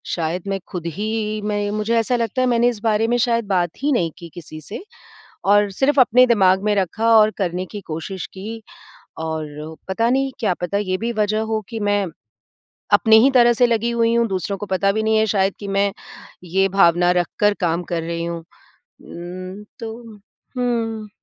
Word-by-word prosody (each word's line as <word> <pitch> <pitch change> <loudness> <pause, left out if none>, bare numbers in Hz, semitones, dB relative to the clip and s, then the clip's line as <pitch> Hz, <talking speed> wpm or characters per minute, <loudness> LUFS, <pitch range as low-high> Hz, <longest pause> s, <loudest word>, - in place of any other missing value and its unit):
शायद 170 +3 -3
मैं 195 0 -1
ख़ुद 175 -2 -6
ही 215 0 -2
मैं 205 -1 -1
मुझे 215 +2 -1
ऐसा 235 +2 0
लगता 235 +1 -1
है 255 - +2
मैंने 240 -1 +3
इस 235 -3 -5
बारे 220 0 +2
में 240 +1 +1
शायद 235 -1 +1
बात 180 -3 +1
ही 295 - +2
नहीं 175 - +1
की 170 - -10
किसी 155 -3 -10
से 205 - -8 0.6
और 205 +1 +4
सिर्फ़ 270 +8 +2
अपने 250 +1 +5
दिमाग 190 -5 +3
में 210 0 +2
रखा 205 +4 0
और 215 0 +5
करने 180 -1 -2
की 205 - -6
कोशिश 165 +4 -5
की 220 +4 -7 0.6
और 155 0 -5
पता 225 +5 +1
नहीं 270 +1 +1
क्या 205 -6 +1
पता 175 +3 -1
ये 185 -2 -1
भी 230 +3 -2
वजह 215 +1 +1
हो 220 - +1
कि 225 -2 -5
मैं 205 -1 +1 0.9
अपने 220 0 +6
ही 275 - +4
तरह 240 -2 +5
से 245 +1 +3
लगी 230 0 0
हुई 230 0 +2
हूँ, 235 0 +2
दूसरों 195 0 -3
को 205 - -6
पता 195 0 +1
भी 220 +2 -1
नहीं 220 0 +2
है 220 - +3
शायद 195 -2 +1
कि 205 - -7
मैं 200 0 +1 0.5
ये 190 +2 +1
भावना 175 -2 +4
रखकर 205 +4 +1
काम 170 0 0
कर 170 -1 0
रही 170 0 -3
हूँ। 170 0 -4 0.6
उम्म 185 +3 -8 0.2
तो, 225 -1 -5 0.6
हुँ। 225 -3 -2
205 Hz, 190 wpm, -20 LUFS, 185-230 Hz, 0.9 s, अपने